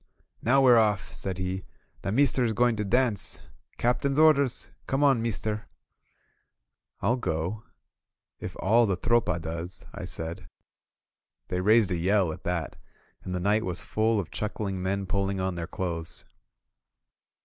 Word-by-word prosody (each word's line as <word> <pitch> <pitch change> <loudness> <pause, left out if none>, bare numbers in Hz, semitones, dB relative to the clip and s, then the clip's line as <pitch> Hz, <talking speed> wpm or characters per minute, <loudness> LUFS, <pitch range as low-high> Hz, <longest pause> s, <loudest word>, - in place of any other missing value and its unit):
"Now 135 +4 +4
we're 125 -3 +7
off!" 105 -4 +1
said 95 -2 -3
he. 95 0 -3 0.4
"The 95 - -2
meester 135 +2 +3
is 115 -2 +1
going 120 +1 +3
to 105 - 0
dance! 115 0 +1 0.4
Captain's 135 +3 +1
orders! 140 -5 +4 0.2
Come 135 +2 +1
on, 135 -5 +4
meester 110 -2 -2 0.6
!" - - -32
"m 120 +6 +2
go 85 +2 -2 0.8
if - - -6
all 115 +4 +4
the 95 -3 0
Tropa 115 -5 +2
does," 85 +2 -6
I - - -6
said. 80 +1 -6 1.0
They 90 - -1
raised 105 0 +4
a 90 - +1
yell 95 -1 +2
at - - -12
that, 85 -3 -2 0.5
and 90 - -4
the - - -1
night 105 +4 +2
was 90 -1 -3
full 110 0 +1
of 95 - -5
chuckling 105 -3 -3
men 100 +1 -1
pulling 100 0 -1
on 95 0 -1
their 85 -1 -4
clothes. 85 -2 -3
100 Hz, 150 wpm, -27 LUFS, 90-115 Hz, 1.0 s, we're